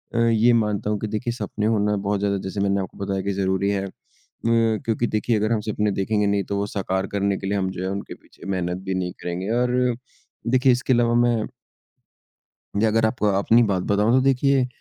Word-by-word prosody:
अ, -, -, +1 dB
ये 115 Hz, +2 st, +4 dB
मानता 105 Hz, -2 st, 0 dB
हूँ 105 Hz, -1 st, -1 dB
कि 110 Hz, -, -3 dB
देखिए 115 Hz, +3 st, -2 dB
सपने 110 Hz, -3 st, -4 dB
होना 105 Hz, -2 st, +2 dB
बहुत 100 Hz, 0 st, -1 dB
ज़्यादा 100 Hz, -1 st, 0 dB
जैसे 95 Hz, +1 st, -4 dB
मैंने 100 Hz, 0 st, +1 dB
आपको 95 Hz, -, -8 dB
बताया 95 Hz, -1 st, -1 dB
कि 100 Hz, +1 st, -2 dB
ज़रूरी 95 Hz, 0 st, 0 dB
है, 100 Hz, -1 st, -1 dB, 0.6 s
म 115 Hz, -1 st, +3 dB
क्योंकि 115 Hz, +1 st, 0 dB
देखिए 110 Hz, +2 st, 0 dB
अगर 110 Hz, +2 st, 0 dB
हम 110 Hz, -2 st, +1 dB
सपने 105 Hz, -1 st, -1 dB
देखेंगे 105 Hz, +2 st, 0 dB
नहीं, 100 Hz, -1 st, +1 dB
तो 100 Hz, -, -3 dB
वो 100 Hz, -, 0 dB
साकार 95 Hz, -1 st, -2 dB
करने 100 Hz, -1 st, 0 dB
के 95 Hz, -, -5 dB
लिए 100 Hz, 0 st, 0 dB
हम 95 Hz, -1 st, 0 dB
जो 90 Hz, -, -5 dB
है 95 Hz, -, -2 dB
उनके 100 Hz, +1 st, -5 dB
पीछे -, -, -17 dB
मेहनत 90 Hz, -2 st, -2 dB
भी 95 Hz, -1 st, -2 dB
नहीं 90 Hz, -1 st, -2 dB
करेंगे 90 Hz, +3 st, -4 dB
और 125 Hz, 0 st, +1 dB, 0.8 s
देखिए 130 Hz, +1 st, +4 dB
इसके 125 Hz, +1 st, 0 dB
अलावा 120 Hz, 0 st, +3 dB
मैं 120 Hz, -2 st, +2 dB, 1.3 s
अगर 110 Hz, +1 st, +3 dB
आप 110 Hz, 0 st, -4 dB
अपनी 105 Hz, +4 st, +4 dB
बात 95 Hz, -4 st, +1 dB
बताऊँ 105 Hz, +3 st, +2 dB
तो 130 Hz, -, +5 dB
देखिए, 135 Hz, -1 st, +3 dB
105 Hz, 210 wpm, -23 LUFS, 100-115 Hz, 1.3 s, तो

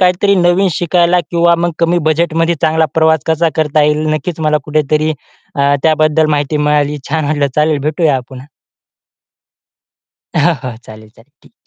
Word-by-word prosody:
काहीतरी 185 Hz, +2 st, +2 dB
नवीन 180 Hz, +1 st, +2 dB
शिकायला 175 Hz, 0 st, +1 dB
किंवा 170 Hz, 0 st, +3 dB
मग 175 Hz, +1 st, 0 dB
कमी 170 Hz, +1 st, +1 dB
बजेटमध्ये 165 Hz, +1 st, 0 dB
चांगला 160 Hz, +1 st, +2 dB
प्रवास 160 Hz, -1 st, +2 dB
कसा 160 Hz, +1 st, +1 dB
करता 155 Hz, -1 st, +1 dB
येईल, 150 Hz, +1 st, +1 dB
नक्कीच 155 Hz, +2 st, -4 dB
मला 155 Hz, -1 st, +1 dB
कुठेतरी 155 Hz, +1 st, 0 dB, 0.4 s
अ, 140 Hz, 0 st, +2 dB
त्याबद्दल 155 Hz, 0 st, +2 dB
माहिती 145 Hz, 0 st, -1 dB
मिळाली. 150 Hz, 0 st, 0 dB
छान 155 Hz, 0 st, -1 dB
वाटलं. 145 Hz, -1 st, 0 dB
चालेल, 150 Hz, -1 st, +1 dB
भेटूया 150 Hz, -4 st, 0 dB
पुन्हा. 130 Hz, 0 st, -11 dB, 1.9 s
हां, 165 Hz, +3 st, +2 dB
हां. 125 Hz, -4 st, -6 dB
चालेल, 110 Hz, 0 st, -13 dB
चालेल 115 Hz, +5 st, -23 dB
ठीक -, -, -22 dB
आहे. -, -, -57 dB
155 Hz, 155 wpm, -13 LUFS, 150-170 Hz, 1.9 s, किंवा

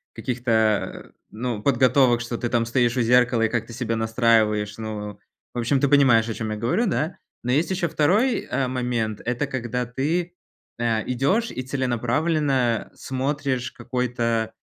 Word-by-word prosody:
каких-то, 125 Hz, -1 st, -3 dB
э, 110 Hz, -2 st, +1 dB, 0.2 s
ну, 115 Hz, -1 st, -3 dB
подготовок, 125 Hz, -1 st, +3 dB
что 120 Hz, 0 st, -4 dB
ты 120 Hz, -, -2 dB
там 115 Hz, 0 st, +1 dB
стоишь 120 Hz, 0 st, +1 dB
у 125 Hz, -, +1 dB
зеркала 120 Hz, 0 st, +3 dB
и 115 Hz, -, +2 dB
как-то 115 Hz, 0 st, -3 dB
себя 115 Hz, -1 st, -2 dB
настраиваешь. 110 Hz, -2 st, +2 dB
Ну, 105 Hz, -2 st, -6 dB, 0.3 s
в 120 Hz, -, -3 dB
общем, 125 Hz, +3 st, +1 dB
ты 140 Hz, -, +3 dB
понимаешь, 125 Hz, -6 st, +5 dB
о -, -, -2 dB
чём 110 Hz, 0 st, -4 dB
я 105 Hz, -, -3 dB
говорю, 120 Hz, -, 0 dB
да. 160 Hz, -1 st, -1 dB, 0.3 s
Но 125 Hz, -, -1 dB
есть 150 Hz, +6 st, +2 dB
еще 180 Hz, -2 st, 0 dB
2 205 Hz, -, +2 dB
а, 130 Hz, -2 st, 0 dB
момент- 120 Hz, -4 st, -2 dB
это 125 Hz, +4 st, -1 dB
когда 125 Hz, -2 st, -3 dB
ты, 160 Hz, +8 st, -2 dB, 0.5 s
а, 115 Hz, -2 st, 0 dB
идешь 140 Hz, -, 0 dB
и -, -, -4 dB
целенаправленно 130 Hz, 0 st, 0 dB
смотришь 135 Hz, -1 st, -2 dB
какой-то, 120 Hz, -3 st, -2 dB
125 Hz, 160 wpm, -23 LUFS, 115-135 Hz, 0.5 s, понимаешь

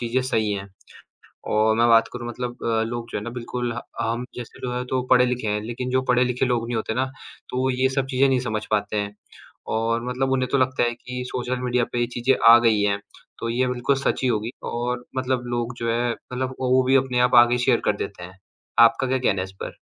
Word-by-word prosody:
चीज़ें 120 Hz, +2 st, 0 dB
सही 110 Hz, -5 st, 0 dB
हैं। 100 Hz, 0 st, -5 dB, 0.8 s
और 110 Hz, +1 st, +3 dB
मैं 115 Hz, -, +4 dB
बात 115 Hz, 0 st, +5 dB
करूँ 120 Hz, -1 st, -6 dB
मतलब 120 Hz, 0 st, -6 dB
अ, 115 Hz, -1 st, +1 dB
लोग 120 Hz, 0 st, -4 dB
जो -, -, -2 dB
है -, -, -6 dB
ना 120 Hz, -, -5 dB
बिल्कुल 120 Hz, 0 st, -4 dB
ह 120 Hz, -, -4 dB, 0.2 s
हम 115 Hz, +2 st, -1 dB
जैसे 120 Hz, -2 st, -9 dB
लोग 125 Hz, 0 st, -2 dB
है 125 Hz, 0 st, -2 dB
तो 130 Hz, 0 st, -1 dB
पढ़े-लिखे 125 Hz, -3 st, +3 dB
हैं, 105 Hz, 0 st, 0 dB
लेकिन 125 Hz, +3 st, -4 dB
जो 130 Hz, 0 st, +2 dB
पढ़े-लिखे 125 Hz, +1 st, +2 dB
लोग 120 Hz, -2 st, 0 dB
नहीं 120 Hz, -, -2 dB
होते 110 Hz, 0 st, -2 dB
ना, 130 Hz, +1 st, +1 dB, 0.5 s
तो 125 Hz, -, -2 dB
वो 130 Hz, -, +2 dB
ये 130 Hz, +1 st, +2 dB
सब 135 Hz, -1 st, +1 dB
चीज़ें 135 Hz, +1 st, +3 dB
नहीं 130 Hz, -1 st, +2 dB
समझ 110 Hz, -3 st, -3 dB
पाते 105 Hz, 0 st, 0 dB
हैं, 100 Hz, 0 st, -2 dB, 0.5 s
और 115 Hz, +1 st, -1 dB
मतलब 130 Hz, +1 st, -1 dB
उन्हें 130 Hz, -1 st, +1 dB
तो 140 Hz, -, +3 dB
लगता 130 Hz, -1 st, +1 dB
है 120 Hz, 0 st, +1 dB
कि 125 Hz, +1 st, -6 dB
सोशल 125 Hz, 0 st, -3 dB
मीडिया 125 Hz, -1 st, +1 dB
पे 120 Hz, -, -1 dB
ये 120 Hz, -, +2 dB
चीज़ें 130 Hz, +3 st, +3 dB, 0.2 s
आ 120 Hz, -, +9 dB
गई 115 Hz, -3 st, +3 dB
हैं, 100 Hz, 0 st, +1 dB, 0.4 s
तो 115 Hz, -, -3 dB
ये 125 Hz, +2 st, +1 dB
बिल्कुल 125 Hz, +2 st, 0 dB
सच 135 Hz, -, -1 dB
ही 130 Hz, -, +2 dB
होगी 110 Hz, -1 st, -1 dB, 0.2 s
और 120 Hz, +1 st, -2 dB
मतलब 130 Hz, -1 st, -1 dB
लोग 120 Hz, +1 st, -3 dB
जो 115 Hz, 0 st, -1 dB
है, 120 Hz, +1 st, 0 dB
मतलब 130 Hz, +2 st, -5 dB
ओ 130 Hz, -1 st, 0 dB
वो 130 Hz, 0 st, +5 dB
भी 135 Hz, +1 st, +5 dB
अपने 130 Hz, -2 st, +1 dB
आप -, -, -2 dB
आगे 120 Hz, +1 st, 0 dB
शेयर 120 Hz, -1 st, +2 dB
कर 105 Hz, -, +2 dB
देते 100 Hz, -3 st, -6 dB
हैं। 95 Hz, +1 st, -12 dB, 0.4 s
आपका 115 Hz, +3 st, +5 dB
क्या 130 Hz, +1 st, +1 dB
कहना 100 Hz, -7 st, +1 dB
है -, -, -2 dB
इस 95 Hz, -, -10 dB
पर? -, -, -7 dB
120 Hz, 245 wpm, -23 LUFS, 115-125 Hz, 0.8 s, आ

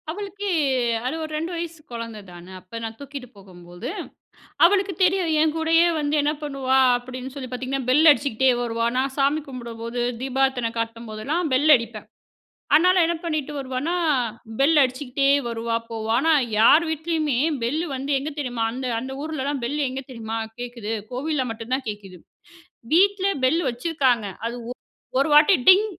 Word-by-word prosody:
அவளுக்கு 405 Hz, +3 st, -5 dB, 0.6 s
அது 260 Hz, +5 st, -1 dB
ஒரு 310 Hz, -, -6 dB
2 330 Hz, +3 st, -3 dB
வயசு 335 Hz, -1 st, -5 dB
கொழந்த 230 Hz, -2 st, -6 dB
தான. 175 Hz, 0 st, -12 dB, 0.2 s
அப்ப 185 Hz, +6 st, -8 dB
நான் 225 Hz, 0 st, -5 dB
தூக்கிட்டு 280 Hz, -2 st, -8 dB
போகும்போது, 175 Hz, -2 st, -10 dB, 0.8 s
அவளுக்கு 390 Hz, +2 st, +3 dB
தெரியும். 365 Hz, -1 st, +2 dB
என் 310 Hz, -1 st, +2 dB
கூடயே 325 Hz, +1 st, +3 dB
வந்து 295 Hz, 0 st, 0 dB
என்ன 295 Hz, +1 st, +1 dB
பண்ணுவா 270 Hz, -2 st, +1 dB, 0.2 s
அப்படின்னு 255 Hz, +1 st, -7 dB
சொல்லி 260 Hz, -3 st, -6 dB
பாத்தீங்கன்னா, 260 Hz, +1 st, -3 dB
பெல் 305 Hz, +5 st, +6 dB
அடிச்சுகிட்டே 265 Hz, -3 st, +1 dB
வருவா. 230 Hz, -1 st, -1 dB
நான் 265 Hz, +1 st, 0 dB
சாமி 285 Hz, +3 st, +2 dB
கும்பிடும்போது, 235 Hz, -2 st, -6 dB, 0.2 s
தீபார்தனை 265 Hz, -3 st, 0 dB
காட்டும்போதெல்லாம் 230 Hz, +8 st, -3 dB
பெல் 290 Hz, +4 st, +4 dB
அடிப்பேன். 230 Hz, -2 st, -5 dB, 0.7 s
அதனால 365 Hz, +3 st, +4 dB
என்ன 340 Hz, -, 0 dB
பண்ணிட்டு 310 Hz, -3 st, -2 dB
வருவானா, 265 Hz, +5 st, -2 dB, 0.7 s
பெல் 300 Hz, +3 st, +5 dB
அடிச்சுகிட்டே 265 Hz, +1 st, 0 dB, 0.2 s
வருவா, 230 Hz, 0 st, -2 dB
போவா. 220 Hz, -1 st, -4 dB
ஆனா 320 Hz, +5 st, +3 dB, 0.3 s
யார் 290 Hz, +9 st, +6 dB
வீட்லயுமே 315 Hz, -4 st, -1 dB, 0.2 s
பெல்லு 300 Hz, +9 st, -1 dB
வந்து, 270 Hz, +2 st, -5 dB
எங்க 285 Hz, +3 st, -4 dB
தெரியுமா 245 Hz, -4 st, -2 dB
அந்த 255 Hz, +2 st, -5 dB
அந்த 260 Hz, +2 st, -6 dB
ஊர்லல்லாம் 290 Hz, -3 st, -3 dB
பெல்லு 290 Hz, +5 st, -2 dB
எங்க 265 Hz, +1 st, -5 dB
தெரியுமா 225 Hz, -2 st, -5 dB, 0.2 s
கேக்குது? 240 Hz, -3 st, -5 dB, 0.2 s
கோவில்ல 280 Hz, +2 st, -1 dB
மட்டுந்தான் 235 Hz, +4 st, -3 dB
கேக்குது. 200 Hz, -3 st, -7 dB, 0.7 s
வீட்ல 390 Hz, +3 st, +4 dB, 0.2 s
பெல்லு 320 Hz, +7 st, +3 dB
வச்சிருக்காங்க. 250 Hz, -4 st, 0 dB, 0.7 s
அது -, -, -, 0.2 s
ஒ -, -, +4 dB
ஒரு 275 Hz, -, +2 dB
வாட்டி 300 Hz, +6 st, +7 dB
"டிங்" 380 Hz, +3 st, +8 dB
265 Hz, 150 wpm, -23 LUFS, 235-315 Hz, 0.8 s, டிங்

